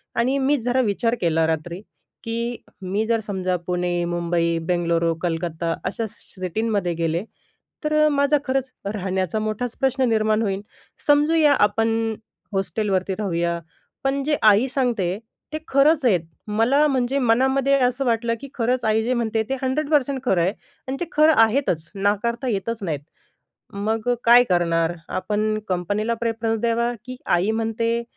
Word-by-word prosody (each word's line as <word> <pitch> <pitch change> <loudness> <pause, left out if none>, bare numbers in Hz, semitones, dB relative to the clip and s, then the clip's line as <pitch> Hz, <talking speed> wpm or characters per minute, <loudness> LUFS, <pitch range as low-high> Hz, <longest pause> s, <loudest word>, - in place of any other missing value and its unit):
आणि, 255 +4 +1
मी 275 +2 +2
जरा 250 +2 +1
विचार 230 +1 0
केला 165 -2 +2
रात्री, 165 +3 -3 0.4
की 235 +1 -2 0.3
मी 195 +4 -1
जर 230 0 +2
समजा 190 -4 -2
पुणे, 175 -1 0
मुंबई, 170 -1 0
बेंगलुरू, 170 -1 +1
कलकत्ता 165 -1 -2
अशा 205 +5 -2
स - - -16 0.2
सिटींमध्ये 190 0 -1
गेले. 165 +1 -1 0.6
तर 305 0 0
अ, - - +5
माझा 285 0 +3
खरंच 265 0 -1 0.2
राहण्याचा 190 0 -1
मोठाच 215 +3 -3
प्रश्न 265 0 +2
निर्माण 215 -1 +2
होईल. 195 -3 -1 0.5
समजूया 295 +1 +5
आपण 225 +1 +1 0.4
हॉस्टेलवरती 195 -1 -1
राहूया, 170 -4 -1 0.4
पण 275 +1 0
जे 295 +1 +1
आई 215 +3 +6
सांगते 230 -9 0 0.4
ते - - 0
खरंच 285 +2 +4
आहेत. 190 -8 +4 0.3
मला 230 +8 +3
म्हणजे 265 -1 0
मनामध्ये 265 +3 +2
असं 250 +2 +1
वाटलं, 230 -1 +1
की 280 - -7
खरंच 250 +1 0
आई 220 0 +2
जे 245 +3 0
म्हणते 225 -2 0
ते 270 - 0
100% 280 0 +1
खरं 190 -8 +2
आहे. 185 +4 +1 0.3
आणि 265 +1 -3
ते 350 - -1
खरं 310 +1 +5
आहेतच 220 - 0
नाकारता 210 +5 0
येतच 225 0 -2
नाहीत. 155 -6 -2 0.7
मग 215 +3 -2 0.2
काय 240 +1 +7
करणार? 170 -2 +2 0.2
आपण 215 +2 -1
कंपनीला 205 +5 -1
प्रेफरन्स 225 -1 -1
देणार, 235 +1 +1
की 255 +1 -7 0.2
आई 180 +5 +2
म्हणते, 230 +1 -1
225 Hz, 145 wpm, -22 LUFS, 185-255 Hz, 0.7 s, काय